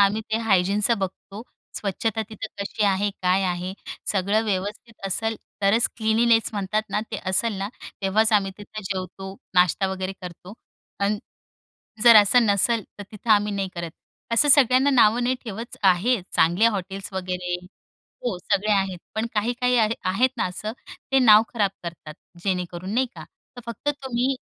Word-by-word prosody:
आम्ही 200 +2 +3
ते 220 - +2
हायजीनचं 200 +2 +2
बघतो, 195 +2 -6 0.3
स्वच्छता 220 +2 -2
तिथं 220 -3 -6
कशी 205 +1 -2
आहे? 200 +1 +1
काय 185 +2 +2
आहे? 180 +1 -2 0.4
सगळं 200 +3 +1
व्यवस्थित 205 +2 -4
असेल 225 +3 -1 0.3
तरच 210 +4 +4
क्लीन्लीनेस 225 +1 +3
म्हणतात 210 +1 -1
ना 210 - 0
ते - - -3
असेल 215 +5 +1
ना, 195 - -3 0.3
तेव्हाच 215 +4 +2
आम्ही 195 -2 +3
तिथं 215 +1 -9
जेवतो, 190 0 -5 0.2
नाश्ता 180 +1 +3
वगैरे 190 0 -4
करतो 180 +2 -9 0.5
अन् 205 +1 +1 0.8
जर 235 -2 +9
असं 215 +3 +6
नसेल 210 +3 +2 0.2
तर - - -6
तिथं 220 +2 -6
आम्ही 210 -1 +4
नाही 195 -1 -2
करत. 170 -1 -5 0.4
असं 290 +6 +4
सगळ्यांना 265 0 +6
नावं 240 -2 +4
नाही 255 +1 +1
ठेवत, 225 +2 -7
आहे 195 +5 +3
चांगल्या 180 +8 +3
हॉटेल्स 195 -1 -5
वगैरे 180 -1 -3 0.7
हो, 225 -7 -1
सगळे 200 +3 0
आहेत. 190 -2 0 0.2
पण 220 +1 -1
काही-काही 245 +3 +1
आहे 220 0 +2 0.2
आहेत 250 +7 +2
ना - - 0
असं, 210 +4 -5 0.4
ते 270 - +5
नाव 220 -4 +7
खराब 205 -4 +1
करतात, 165 -3 -8 0.3
जेणेकरून 180 +1 -3
नाही 260 +1 +2
का? - - -9 0.3
तर - - -7
फक्त 235 +5 -5 0.2
तुम्ही 260 +1 0
205 Hz, 155 wpm, -24 LUFS, 190-225 Hz, 0.8 s, जर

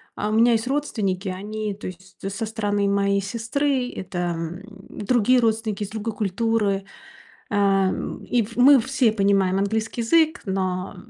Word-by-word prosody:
А, 210 - -2
у - - -1
меня 230 +2 +5
есть 225 +2 0
родственники- 210 -9 -1
они, 210 +2 -4
то 205 - -8
есть 185 +1 -11
со 200 +3 -3
стороны 205 -2 -1
моей 200 0 +2
сестры, 245 +5 -1
это, 185 -1 -6 0.2
м, 165 +2 -5 0.3
другие 245 +3 +2
родственники, 220 -2 0
из 205 - -5
другой 220 +1 -4
культуры. 205 -1 0 0.7
Ам, 195 -2 +1
и 245 - +1
в 225 +2 -9
мы 270 +3 +7
все 250 -1 +1
понимаем 195 -2 +2
английский 220 +4 -1
язык, 315 +6 +3
но 190 -1 -2
210 Hz, 150 wpm, -23 LUFS, 195-230 Hz, 0.7 s, мы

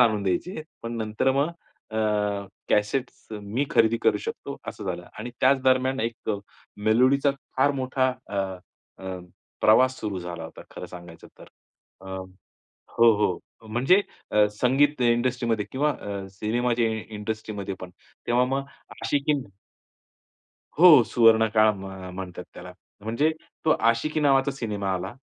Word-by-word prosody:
आणून 110 -4 +4
द्यायचे, 125 - -2 0.2
पण 115 0 -4
नंतर 110 +3 0
मग 140 +4 +2 0.4
अ, 110 - -5 0.7
कॅसेट्स 115 +5 0 0.2
मी 110 +8 -1
खरेदी 115 0 +4
करू 105 -2 +3
शकतो - - -6
असं - - -6
झालं. 90 -2 -4
आणि 120 +3 -5
त्याच 135 +1 +4
दरम्यान 130 +1 +2
एक 115 0 -4
अ, 105 - 0 0.5
मेलोडीचा 130 +5 +4 0.3
फार 135 +2 +4
मोठा 130 0 +1 0.2
अ, 100 - -5 0.7
अ, 95 -1 -4 0.4
प्रवास 130 +4 +5
सुरू 105 -4 -3
झाला 85 -2 -6
होता, 80 - -10
खरं - - -8
सांगायचं 85 -2 -12
तर. - - -12 0.6
अ, 95 - -13 0.9
हो, 115 0 +7
हो, 100 -4 +1 0.3
म्हणजे 130 - +4 0.3
अ, 105 0 +5 0.2
संगीत 135 +2 +3
इंडस्ट्रीमध्ये 120 -2 +1
किंवा 150 +3 +1
अ, 100 -6 -6
सिनेमाचे 115 +3 0 0.2
इंडस्ट्रीमध्ये 105 -2 -5
पण. 90 - -8 0.4
तेव्हा 120 +1 +3
मग 135 +2 -1 0.4
आशिकी 145 +1 +1 1.5
हो 160 -6 +9
सुवर्णकाळ 110 -1 +5
म्ह 95 -1 -8
म्हणतात 90 -1 -7
त्याला. 90 +1 -9 0.3
म्हणजे 115 +9 +1 0.3
तो 160 - +3
आशिकी 115 +7 +1
नावाचा 135 -1 +3
सिनेमा 105 -7 -3
आला. 95 +4 -4
115 Hz, 135 wpm, -25 LUFS, 100-130 Hz, 1.5 s, हो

